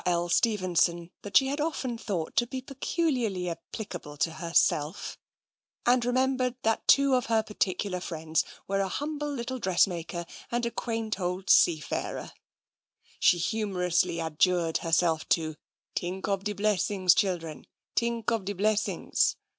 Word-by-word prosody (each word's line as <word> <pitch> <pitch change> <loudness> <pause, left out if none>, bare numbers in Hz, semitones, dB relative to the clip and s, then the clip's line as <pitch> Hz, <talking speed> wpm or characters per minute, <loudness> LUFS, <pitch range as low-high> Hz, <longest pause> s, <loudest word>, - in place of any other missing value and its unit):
L. 175 -1 +1
Stevenson 180 -4 +2
that 200 -2 +3
she 270 - +5
had 285 +2 -2
often 275 -6 -2
thought 190 -8 -4
to 240 +1 +3
be 260 +2 -4
peculiarly 255 - -1
applicable 175 -3 -7
to 140 +5 +1
herself, 160 0 0 0.7
and 245 0 +4
remembered 255 0 +1
that 225 0 0
two 275 -1 +5
of 250 -2 +2
her 225 -1 +2
particular 195 -3 -1
friends 160 -2 -1 0.2
were 195 0 0
a 195 - +1
humble 295 +6 -3
little 260 -1 -4
dressmaker 175 -3 0 0.3
and 240 0 0
a 235 - -1
quaint 225 -4 -3
old 180 +1 -1
seafarer; 155 -3 +2 0.9
she 175 - +5
humorously 180 -3 0
adjured 165 +1 +1
her 165 - -4
self 165 -1 +2
to 155 -2 +1 0.2
" - - -52
t'ink 180 +2 -3
ob 195 -1 -1
de 210 - -1
blessings, 200 -2 +3
children, 175 -6 -2 0.3
t'ink 235 -1 0
ob 225 -5 -1
de 205 - -2
blessings." 210 +2 +1
195 Hz, 145 wpm, -28 LUFS, 175-235 Hz, 0.9 s, she